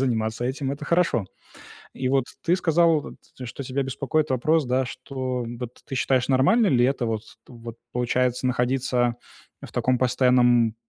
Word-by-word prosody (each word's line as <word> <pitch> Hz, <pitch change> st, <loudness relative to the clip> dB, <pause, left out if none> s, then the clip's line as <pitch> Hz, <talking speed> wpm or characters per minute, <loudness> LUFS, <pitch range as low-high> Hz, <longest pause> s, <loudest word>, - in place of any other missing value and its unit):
заниматься 115 Hz, -2 st, -1 dB
этим. 135 Hz, +1 st, -2 dB
Это 145 Hz, +1 st, -7 dB
хорошо. 165 Hz, -, +1 dB, 0.7 s
И 130 Hz, -1 st, -2 dB
вот 135 Hz, -1 st, +2 dB, 0.2 s
ты 175 Hz, +2 st, +2 dB
сказал, 165 Hz, -2 st, +3 dB
вот, -, -, -10 dB, 0.3 s
что 125 Hz, +3 st, -7 dB
тебя 135 Hz, +2 st, -2 dB
беспокоит 140 Hz, +3 st, -1 dB
вопрос, 155 Hz, +4 st, +2 dB
да, 130 Hz, +1 st, 0 dB
что, 130 Hz, -1 st, -4 dB, 0.2 s
вот, 125 Hz, 0 st, -7 dB
ты 135 Hz, -, -5 dB
считаешь, 130 Hz, 0 st, +1 dB
нормально 140 Hz, -, +4 dB
ли 120 Hz, -3 st, +3 dB
это 130 Hz, -2 st, 0 dB
вот 110 Hz, -1 st, -2 dB, 0.2 s
вот, 115 Hz, -1 st, -10 dB, 0.2 s
получается, 125 Hz, +1 st, 0 dB
находиться 125 Hz, -1 st, 0 dB, 0.5 s
в -, -, -10 dB
таком 125 Hz, -1 st, +1 dB
постоянном, 125 Hz, -3 st, +3 dB
130 Hz, 155 wpm, -24 LUFS, 120-140 Hz, 0.7 s, нормально